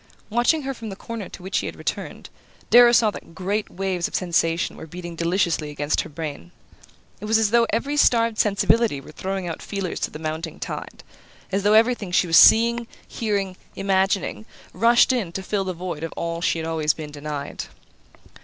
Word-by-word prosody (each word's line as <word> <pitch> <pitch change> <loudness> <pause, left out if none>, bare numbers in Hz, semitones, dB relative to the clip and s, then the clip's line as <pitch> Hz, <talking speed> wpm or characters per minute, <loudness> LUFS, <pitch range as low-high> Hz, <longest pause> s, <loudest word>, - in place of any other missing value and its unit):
Watching 245 +7 +2
her 270 0 -3
from 230 -3 -8
the 195 - -6
corner 220 -1 -7
to - - -11
which 190 - -1
he - - -4
had - - -6
returned, - - -5 0.4
Darrow 240 0 +8
saw 225 -3 +4
that 165 - -11
great 200 +4 -2
waves 185 -2 -2
of - - -7
sensation 170 -2 0
were 160 - -10
beating 175 +1 -8
deliciously 170 -2 0
against 145 +1 -1
her - - -9
brain. 150 - -6 0.7
It 210 - -7
was 220 +1 +3
as 220 -2 +2
though 235 0 +4
every 285 +5 -1
starved 230 -5 +3
sensibility 210 -4 +2
were 135 - -12
throwing 190 +2 -4
out 165 - -5
feelers 195 -3 -4
to - - -1
the - - -8
mounting 160 +1 -5
tide; - - -7 0.5
as 195 +1 0
though 205 +1 +3
everything 225 -3 +3
she 180 - +3
was 165 -1 +1
seeing, 235 +1 +6 0.2
hearing, 200 -4 -2 0.2
imagining, 190 - 0 0.3
rushed 235 +6 +4
in 215 -9 -2
to 190 - -4
fill 195 0 -1
the 185 - -2
void 175 -3 -6
of 165 - -4
all 170 0 -3
she 175 -1 +1
had 160 0 -4
always 155 -2 +1
been 155 -2 -7
denied. 145 -1 -5
190 Hz, 190 wpm, -23 LUFS, 165-220 Hz, 0.7 s, Darrow